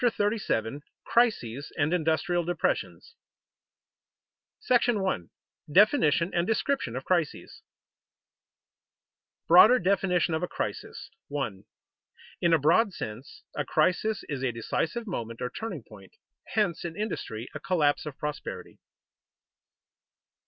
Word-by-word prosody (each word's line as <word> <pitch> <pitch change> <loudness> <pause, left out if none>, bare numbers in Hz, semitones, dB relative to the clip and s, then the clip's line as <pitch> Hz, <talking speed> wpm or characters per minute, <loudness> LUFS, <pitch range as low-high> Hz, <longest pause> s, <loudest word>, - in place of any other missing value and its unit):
CHAPTER 240 -2 +2
37 145 - -1 0.2
CRISES 145 - +1
AND 145 +4 +1
INDUSTRIAL 170 +1 +1
DEPRESSIONS 175 +1 -2 1.6
§ 235 -6 +3
I. 85 - -9 0.4
DEFINITION 180 - +4
AND 170 +1 +1
DESCRIPTION 225 - 0
OF 130 - -5
CRISES 170 -5 -1
[Sidenote: - - -28
Broader 210 +9 +8
definition 185 -4 +1
of 160 - 0
a 180 - -1
crisis] - - -5 0.2
1. 135 -10 -4 0.8
_In 170 -1 +4
a - - +4
broad 175 - +3
sense, 110 +1 -8
a 145 - -1
crisis 185 +9 +1
is 135 -3 -4
a 130 - +1
decisive 160 - -2
moment 115 - -5
or 125 - -3
turning 190 - -5
point; 100 -4 -15 0.4
hence, 200 -6 +1
in 170 -2 -5
industry, 125 - -4
a 150 - -5
collapse 155 -4 +1
of 145 - -7
prosperity. 150 0 -6
165 Hz, 115 wpm, -28 LUFS, 140-200 Hz, 1.6 s, Broader